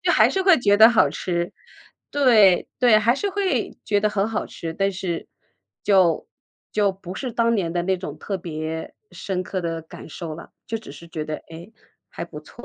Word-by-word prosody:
就 - - +2
还 - - +5
是 385 - 0
会 370 -5 +6
觉 205 -4 +4
得 220 - +10
好 215 -12 +4
吃， 175 +2 -2 0.6
对， 225 -10 +5
对， 240 -3 +6
还 230 +3 +3
是 400 +8 -2
会 390 -1 -1
觉 205 -1 +1
得 210 - +2
很 205 0 0
好 220 - -2
吃， 165 -1 -6
但 195 +4 0
是 180 -2 -4 0.6
就 185 -5 +3 0.5
就 205 -2 +2
不 185 -1 -9
是 255 +5 -4
当 230 0 +2
年 175 -6 0
的 175 0 0
那 190 0 0
种 150 -5 -6
特 195 +2 -4
别 160 -1 -5 0.2
深 185 -2 -3
刻 185 +1 -4
的 165 -2 -3
感 160 - -12
受 160 -1 -6
了。 170 - -11 0.2
就 225 -1 -3
只 220 - -12
是 170 - -12
觉 155 -2 -5
得， 155 - -3 0.2
哎， 170 +6 -10 0.4
还 - - -6
不 150 -3 -10
错。 240 +10 -14
190 Hz, 220 characters per minute, -23 LUFS, 170-220 Hz, 0.6 s, 得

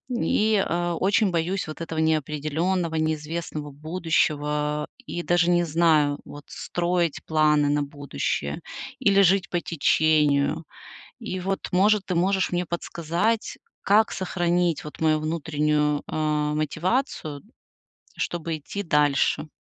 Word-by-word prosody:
и, 215 -3 +2
э, 175 0 -1
очень 200 +1 +2
боюсь 175 +3 -1
вот 155 +1 -8
этого 165 -1 -5
неопределённого, 160 +3 0
неизвестного 155 -1 -3
будущего. 150 -1 -1 0.2
И 175 - -4
даже 175 0 +2
не 175 0 +3
знаю, 155 -3 +3
вот 145 0 -10
строить 175 -2 -1
планы 150 -2 +3
на 145 0 +1
будущее 140 - -3 0.4
или 200 0 +4
жить 190 0 +3
по 175 - 0
течению. 155 -1 +2 0.5
И 220 -6 -4
вот, 195 +2 -3
может, 200 +2 +3
ты 180 - -1
можешь 190 +2 +1
мне 175 0 0
подсказать, 170 +6 -2 0.3
как 210 +2 +4
сохранить 175 -2 0
вот 150 - -10
мою 155 -1 +3
внутреннюю, 150 -2 0
э, - - -5 0.4
мотивацию, 155 - -1 0.8
чтобы 165 -1 -3
идти 200 +7 -5
дальше? 150 -1 +2
165 Hz, 120 wpm, -25 LUFS, 150-180 Hz, 0.8 s, или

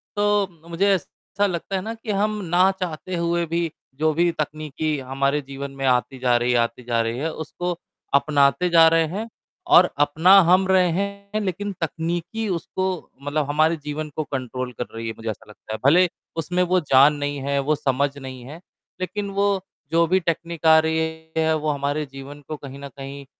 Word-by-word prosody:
तो 205 -1 +2 0.2
मुझे 185 +4 +1
ऐसा 195 +2 -3
लगता 180 +1 -3
है 190 - -1
ना 220 +3 -4
कि 225 -1 -6
हम 210 +2 +1
ना 180 +2 +4
चाहते 180 0 -4
हुए 170 0 0
भी, 165 0 -1 0.2
जो 155 +2 +1
भी 170 +2 +2
तकनीकी 155 0 -3
हमारे 140 +2 0
जीवन 135 0 -7
में 135 0 -3
आती 130 +1 +1
जा 125 -1 +2
रही 120 +1 +1
है, 125 - +3
आती 115 +1 -1
जा 115 -1 0
रही 115 +1 -2
है, 155 +4 -1
उसको 175 +3 -4 0.4
अपनाते 140 +4 +3
जा 165 -1 +7
रहे 165 0 +4
हैं 205 +8 -4 0.5
और 180 +1 +7
अपना 160 +7 +6
हम 185 +1 +5
रहे 185 -2 +4
हैं, 200 +3 -3
लेकिन 200 +1 -3
तकनीकी 170 +7 -2
उसको 185 +2 -2 0.3
मतलब 145 +1 -1
हमारे 155 +3 +3
जीवन 150 +1 -4
को 155 - -1
कंट्रोल 130 -2 -4
कर 125 - -1
रही 115 0 -5
है, 110 - -3
मुझे 115 0 -5
ऐसा 110 - -6
लगता 110 +1 -9
है। - - -4
भले 180 +6 +6 0.3
उसमें 180 +3 0
वो 180 +1 +2
जान 140 -2 +5
नहीं 145 0 -3
है, 140 0 +1
वो 150 +3 +1
समझ 140 0 0
नहीं 130 -2 -8
है, 155 +5 -9 0.4
लेकिन 200 +2 -3
वो, 200 0 +1 0.3
जो 165 0 +4
भी 185 +3 +3
टेक्नीक 170 -1 -3
आ 160 0 +8
रही 160 0 0 0.4
है, 160 0 +3
वो 155 -1 -1
हमारे 145 +1 -1
जीवन 135 +2 -10
को 155 - -5
कहीं 140 -1 -10
न 140 - -7
कहीं 140 0 -8
155 Hz, 195 wpm, -23 LUFS, 140-180 Hz, 0.5 s, आ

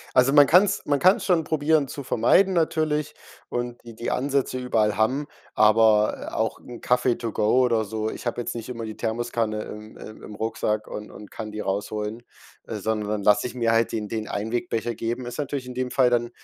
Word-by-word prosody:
Also, 125 +1 +5
man 145 -1 +8
kann's 190 +3 +4
man 145 -1 +2
kann's 190 - +4
schon 175 -4 +2
probieren, 155 -1 +2
zu 140 - -7
vermeiden, 140 - +3
natürlich, 155 -3 0 0.3
und 120 0 -3
die 115 -1 -10
die 115 - -4
Ansätze 135 -1 0
überall 110 -4 +1
haben, 130 +7 +1 0.3
aber, 110 0 +4
äh, - - -6
auch - - -1
'n 120 -1 -11
Kaffee 125 0 +2
to 115 - -4
go 110 +4 +2
oder 115 -3 +2
so 110 +1 -3
ich - - -9
habe 120 0 -1
jetzt 120 - -4
nicht 115 -1 -6
immer 115 -2 -5
die 110 -1 -7
Thermoskanne 115 -1 -2
im 105 +1 -10
im 110 - -11
im 105 - -9
Rucksack 110 0 -2
und 105 0 -7
und 105 0 -12
kann 110 -1 -7
die 105 - -5
rausholen, 105 +3 -3 0.4
äh, - - -6
sondern 105 0 -2
dann 105 -1 -2
lasse 105 +2 +4
ich 125 - -7
mir 115 -2 +1
halt 115 0 +2
den 105 -2 -3
den 110 0 -3
Einwegbecher 115 +1 -2
geben. 120 +3 -3
Ist 120 - -7
natürlich 140 -3 -3
in 125 - -7
dem 125 0 -3
Fall 130 -2 +4
dann 120 -1 +1
120 Hz, 210 wpm, -24 LUFS, 110-130 Hz, 0.4 s, man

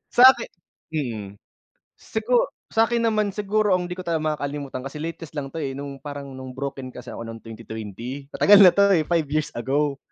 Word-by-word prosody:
Sa 245 - +7
aki - - -6 0.5
mm. 110 -8 -4 0.6
Sigu 230 +2 +1 0.2
sa 225 0 +4
'kin 235 -1 0
naman 215 -3 +1
siguro 210 -1 +1
ang 180 -1 -2
di 180 - -5
ko 185 - -7
talaga 165 -2 -1 0.2
makakalimutan, 140 -2 -4
kasi 150 +2 -6
latest 165 -1 -6
lang 140 -2 -3
'to - - -7
eh, 135 -3 -3
no'ng 140 0 -7
parang 140 -1 -7
no'ng 130 -1 -8
broken 135 -2 -5
kasi 125 0 -9
ako 115 - -7
no'ng 115 0 -8
2020. 115 +4 -7
Matagal 205 0 +6
na 180 -2 +10
'to 200 -1 +4
eh, 160 -3 +3
5 165 -1 +1
years 155 +1 -1
ago. 140 +3 0
145 Hz, 195 wpm, -24 LUFS, 130-185 Hz, 0.6 s, na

